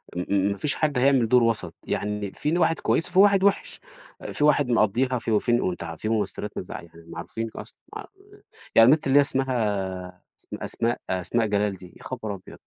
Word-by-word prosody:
م 90 - -3
م 100 -1 +2
ما 100 - -4
فيش 145 +4 +3
حد 150 -4 -1
هيعمل 130 -2 +3
دور 125 0 +5
وَسط، 115 -2 -1
يعني 105 -1 -3
في 150 - -3
هنا 175 - +1
واحد 165 -1 +2
كويس 165 - 0
وفي 185 +2 +2
واحد 200 -1 +5
وِحِش، 200 0 0 0.4
آآ، - - -7
في 150 - -2
واحد 145 -3 +3
مقَضّيها 120 +3 +1
في 115 - -4
وفين 120 +3 +2
وأنت 90 -2 -3
ع 85 0 -7
في 110 - -4
ممثلات 105 -1 -2
ما - - -3
تزع - - -8
يعني 85 0 -16
معروفين 85 +7 -6
أصلًا - - -9 0.2
ما - - -5
ع - - -11 0.7
يعني 115 +2 +7
البت 150 -1 +2
اللي 135 +1 +4
هي - - +7
اسمها 100 -10 -2 0.2
أس - - -9
أسماء 120 +1 +1
أسماء 105 +5 0
جلال 105 -1 0
دي، 90 -1 -14
يا - - -16
خبر 110 -5 -5
أبيض! 95 - -13
115 Hz, 215 wpm, -24 LUFS, 100-135 Hz, 0.7 s, يعني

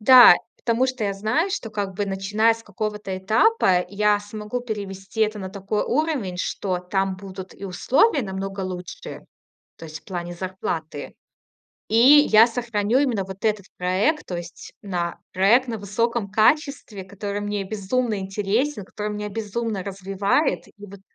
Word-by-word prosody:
Да, 245 -3 +10 0.2
потому 235 +2 +1
что 255 -4 -3
я 200 - 0
знаю, 220 - 0
что, 245 - -3
как 200 -2 -3
бы, 205 +2 -2
начиная 205 +4 +2
с 225 - -13
какого-то 210 -1 -4
этапа, 195 - +3
я 205 +1 +2
смогу 210 +3 -5
перевести 200 -3 -6
это 215 -1 +2
на 190 -2 -5
такой 200 +2 -2
уровень, 270 - -1
что 185 0 -2
там 190 +1 -1
будут 190 0 -9
и 200 - -10
условия 265 - +2
намного 195 -1 -5
лучше, 180 -2 -7 0.5
то - - -9
есть 155 0 -9
в - - -36
плане 175 -2 -5
зарплаты. 170 -5 -5 0.7
И 220 - +1 0.3
я 220 +1 +8
сохраню 230 -1 0
именно 245 -8 +1
вот 190 +2 -10
этот 210 -3 0
проект. 195 - +1
То 180 - -4
есть 170 0 -10
на 175 -4 -3
проект 225 +8 +4
на 230 - -2
высоком 210 +1 -1
качестве, 220 - +1
который 200 +1 -5
мне 205 -1 -2
безумно 215 +3 -1
интересен, 205 +5 -1
который 210 0 -4
меня 210 0 -4
безумно 215 0 -3
развивает. 195 - 0
И - - -20
вот 200 0 -12
205 Hz, 155 wpm, -23 LUFS, 190-225 Hz, 0.7 s, Да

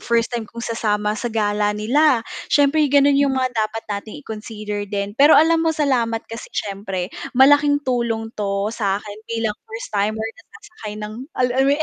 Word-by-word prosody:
first 235 0 0
time 230 -3 -3
kong 235 0 -7
sasama 210 -2 0
sa 230 +3 -3
gala 210 -2 +1
nila, 245 +3 +3 0.2
siyempre 290 +2 +3
gano'n 285 +1 +5
'yong 280 -1 +2
mga 255 -1 +1
dapat 220 -1 -2
nating 205 +6 -5
i-consider 210 -2 -5
din. 200 0 -3
Pero 290 +3 +7
alam 325 +1 +5
mo 325 - +2
salamat 240 -7 0
kasi 230 +1 -8
siyempre 195 -2 -3 0.3
malaking 285 +2 +6
tulong 235 -3 -1
'to 200 -1 -2
sa 200 -4 0
akin 210 0 -9
bilang 225 -2 -1
first 225 +1 -7
timer 215 +2 0
na - - -19
sasakay 350 - -10
ng 210 0 -6 0.2
al 250 - +3
alam 265 +2 +2
mo - - +4
yun, 315 - -1
225 Hz, 185 wpm, -21 LUFS, 210-265 Hz, 0.3 s, Pero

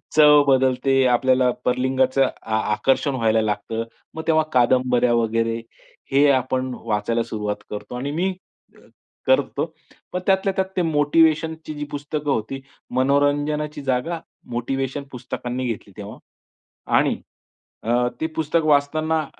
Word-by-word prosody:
चव 150 -1 +7
बदलते. 130 0 +3
आपल्याला 130 +1 +3 0.2
परलिंगाचं 130 +1 +2 0.2
आ, 110 - -2 0.2
आकर्षण 135 +4 +1
व्हायला 115 -2 +2
लागतं. 110 +1 -2 0.3
मग 160 - -5
तेव्हा 160 -1 +4
कादंबऱ्या 125 -1 +3
वगैरे 115 0 0 0.5
हे 140 +2 +5
आपण 130 0 0
वाचायला 115 +1 0
सुरुवात 105 -2 -3
करतो 105 +3 -7
आणि 135 +3 -3
मी 180 +5 0 0.9
करतो. - - +2 0.5
पण 180 - -2
त्यातल्या 195 0 +2
त्यात 190 - +1
ते - - +3
मोटिव्हेशनची 160 +1 +2
जी 150 - -4
पुस्तकं 145 0 -3
होती. 135 +3 -2 0.3
मनोरंजनाची 145 +3 +1
जागा 135 +6 -1 0.3
मोटिव्हेशन 135 +3 -2
पुस्तकांनी 125 0 -5
घेतली 105 -3 -5
तेव्हा. 105 +1 -8 0.8
आणि - - +2 0.7
अ, 120 +2 +2
ते 160 - +1
पुस्तक 160 +1 +1
वाचताना 155 +2 +2
135 Hz, 120 wpm, -22 LUFS, 120-150 Hz, 0.9 s, चव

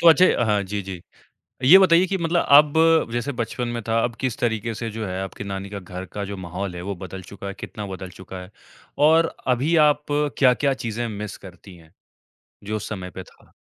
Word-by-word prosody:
तो 170 - +7
अच्छा 165 -5 +5
हाँ 105 -2 +1
जी, 100 +2 -4
जी। 95 -2 -8 0.6
ये 170 +9 +9
बताइए 185 -1 +5
कि 195 - -1
मतलब 170 0 +1
अब 150 0 +5
जैसे 120 +4 -2
बचपन 120 0 -3
में 115 - -4
था, 115 0 +2
अब 120 -1 -2
किस 130 -4 -2
तरीके 115 -1 -1
से 115 +1 -4
जो 110 0 -5
है 95 0 -4
आपकी 95 +1 -7
नानी 100 0 -5
का 100 - -5
घर 90 0 -8
का 100 - -4
जो 100 0 -6
माहौल 90 +1 -5
है, 85 - -6
वो 100 +2 -4
बदल 95 +1 -8
चुका 100 +2 -10
है, 100 - -6
कितना 105 -1 -6
बदल 95 -1 -7
चुका 95 0 -10
है? 90 - -12 0.6
और 165 +1 +3
अभी 130 +6 +1
आप 150 0 0 0.3
क्या-क्या 135 +1 +3
चीज़ें 115 +1 -2
मिस 105 -1 -6
करती 95 0 -13
हैं, 80 -2 -19 0.7
जो 105 +2 -3
उस 110 - -5
समय 95 -4 -5
पे - - -6
था? - - -23
105 Hz, 215 wpm, -23 LUFS, 95-135 Hz, 0.7 s, ये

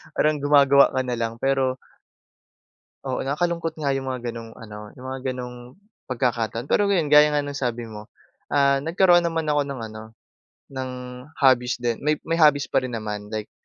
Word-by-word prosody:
parang 150 -1 +2
gumagawa 140 -1 +5
ka 130 - +1
na 125 -2 -3
lang 115 0 -2
pero 135 +1 0 1.3
Oo, 130 -1 -3
nakakalungkot 165 +3 -1
nga 145 -3 -1
'yong 135 -1 -2
mga 125 -2 -3
ganong, 115 -1 -9
ano, 105 -1 -10
'yong 130 - -12
mga 130 0 -5
ganong 125 0 -9 0.3
pagkakataon, 120 -1 -2
pero, 205 - +3
ngayon 175 -7 +1
gaya 150 0 +8
nga 145 -1 +1
ng 145 0 -5
sabi 120 -3 -2
mo, 105 0 -10 0.5
ah, 140 -1 +4
nagkaroon 175 +3 +3
naman 165 -1 -1
ako 145 -1 +2
ng 140 -2 -5
ano, 110 0 -9 0.7
ng 130 -1 -4 0.5
hobbies 125 -3 +3
din, 120 -2 -2
may 150 +1 +1
may 165 +1 -1
hobbies 150 -3 +5
pa - - +4
rin 125 -2 -4
naman, 105 -2 -5
like 110 -1 -5
130 Hz, 175 wpm, -23 LUFS, 120-145 Hz, 1.3 s, gaya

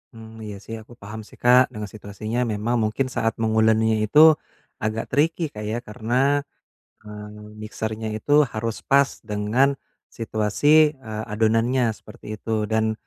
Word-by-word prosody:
Hmm, 110 0 -12
iya 105 -1 -6
sih 115 - -7
aku 120 - -15
paham 105 +2 -8
sih - - -16
Kak 125 +1 +6
dengan 105 -3 -6
situasinya 110 +3 -5
memang 110 +4 -1
mungkin 120 +5 0
saat 115 -1 0
menguleninya 110 0 +3
itu 150 - +4 0.6
agak 110 +1 -2
tricky 160 +4 +1
Kak 105 - -8
ya, 110 +2 -2
karena, 125 +7 0 0.6
eee, 105 0 -10
mixer-nya 110 0 -4
itu 145 +6 +4
harus 110 0 -2
pas 140 0 +4 0.2
dengan 110 +6 +1 0.4
situasi, 145 +8 +3
eee, 110 -2 -5
adonannya 115 +3 +2
seperti 110 -1 -10
itu. 110 -1 -2
Dan, 110 0 +1
110 Hz, 140 wpm, -23 LUFS, 105-120 Hz, 0.6 s, Kak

